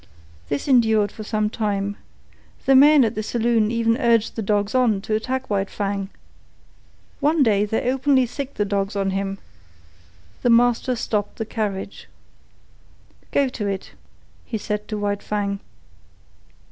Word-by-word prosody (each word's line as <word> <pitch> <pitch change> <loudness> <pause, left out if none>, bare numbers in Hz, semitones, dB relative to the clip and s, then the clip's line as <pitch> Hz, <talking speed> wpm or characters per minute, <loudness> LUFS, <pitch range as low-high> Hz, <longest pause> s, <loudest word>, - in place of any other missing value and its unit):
This 145 - -2
endured 220 -6 +3
for 215 - -8
some 215 0 0
time. 205 -2 -2 0.7
The 270 - +5
men 285 0 +7
at 220 - -1
the 215 - -3
saloon 225 -1 +1
even 230 0 +1
urged 235 -4 +2
the 225 - -3
dogs 205 +1 0
on 245 -6 +3
to 215 - -3
attack 255 +4 -2
White 195 -1 -1
Fang. 200 -1 -3 1.1
One 300 0 +3
day 210 -4 +3
they 220 +3 -2
openly 265 0 +3
sicked 275 +3 -6
the 205 - 0
dogs 200 0 -2
on 195 -1 0
him. 195 0 -2 1.0
The 245 - +2
master 245 +1 +3
stopped 210 -3 -2
the 225 - -4
carriage. 205 -3 -4 1.2
"Go 280 -1 +2
to 215 -5 -4
it," 195 -1 -4 0.5
he 225 - -4
said 210 0 -4
to 215 - -4
White 205 -1 -2
Fang. 200 -1 -2
215 Hz, 145 wpm, -22 LUFS, 205-240 Hz, 1.2 s, men